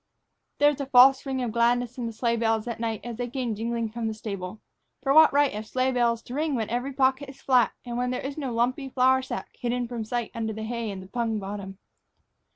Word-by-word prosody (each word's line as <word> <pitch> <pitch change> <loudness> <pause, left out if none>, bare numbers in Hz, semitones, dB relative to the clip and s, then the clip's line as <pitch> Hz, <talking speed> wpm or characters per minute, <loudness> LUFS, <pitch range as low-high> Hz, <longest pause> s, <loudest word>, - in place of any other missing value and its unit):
There 290 0 +5
was 285 - -5
a 275 - -4
false 265 0 +7
ring 260 -1 -1
of 235 - -2
gladness 240 +1 +1
in 235 - -2
the - - -4
sleigh 235 +1 0
bells 225 -1 +1
that 235 -2 -5
night 225 -2 -2
as 240 -2 -6
they 245 0 -3
came 250 -2 -2
jingling 230 +1 -2
from 230 0 -3
the 220 - -3
stable. 200 -2 -6 0.4
For 275 - +2
what 315 +1 +8
right 285 0 +3
have 215 +1 -6
sleigh 255 +2 +1
bells 235 -2 +1
to 245 - -9
ring 300 +1 0
when 225 -3 -2
every 245 +3 -1
pocket 270 +1 +1
is 270 - -12
flat 255 -3 +3
and 240 0 -3
when 250 0 0
there 250 +1 -3
is 275 +1 -4
no 275 -5 -3
lumpy 250 +4 0
flour 260 0 +3
sack 260 - -6
hidden 245 0 -1
from 235 -2 -4
sight 235 +1 -3
under 220 -1 -3
the 220 +1 -6
hay 230 0 -3
in 195 -2 -6
the 185 - -11
pung 230 +1 -1
bottom? 195 -1 -6
240 Hz, 245 wpm, -26 LUFS, 225-260 Hz, 0.4 s, what